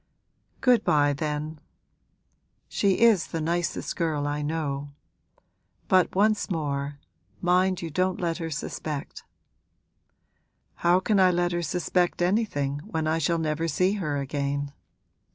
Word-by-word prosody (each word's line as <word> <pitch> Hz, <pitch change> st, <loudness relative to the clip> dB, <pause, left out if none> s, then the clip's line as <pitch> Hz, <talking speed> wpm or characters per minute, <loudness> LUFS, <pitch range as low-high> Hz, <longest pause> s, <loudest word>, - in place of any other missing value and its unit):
'Good 250 Hz, -2 st, +4 dB
bye 145 Hz, -1 st, +3 dB
then. 150 Hz, +1 st, -3 dB, 1.1 s
She 195 Hz, -1 st, +1 dB
is 225 Hz, -6 st, +5 dB
the 165 Hz, -, -4 dB
nicest 170 Hz, +2 st, -2 dB
girl 155 Hz, -4 st, -1 dB
I 145 Hz, 0 st, -2 dB
know. 145 Hz, -2 st, -3 dB, 0.9 s
But 185 Hz, -1 st, +3 dB
once 210 Hz, +2 st, +2 dB
more, 145 Hz, -4 st, -2 dB, 0.4 s
mind 180 Hz, +1 st, +2 dB
you 165 Hz, -, -4 dB
don't 185 Hz, +3 st, 0 dB
let 170 Hz, 0 st, -1 dB
her 165 Hz, -1 st, -3 dB
suspect!' 150 Hz, -1 st, -5 dB, 1.5 s
'How 175 Hz, +1 st, +4 dB
can 205 Hz, 0 st, +2 dB
I 185 Hz, -1 st, +6 dB
let 175 Hz, 0 st, +1 dB
her 175 Hz, 0 st, -1 dB
suspect 175 Hz, +2 st, 0 dB
anything 175 Hz, -8 st, 0 dB
when 160 Hz, -7 st, -2 dB
I 160 Hz, +1 st, +1 dB
shall 165 Hz, +2 st, +1 dB
never 160 Hz, 0 st, -1 dB
see 185 Hz, +3 st, +2 dB
her 155 Hz, -8 st, -2 dB
again?' 140 Hz, +1 st, -2 dB
165 Hz, 130 wpm, -26 LUFS, 145-185 Hz, 1.5 s, I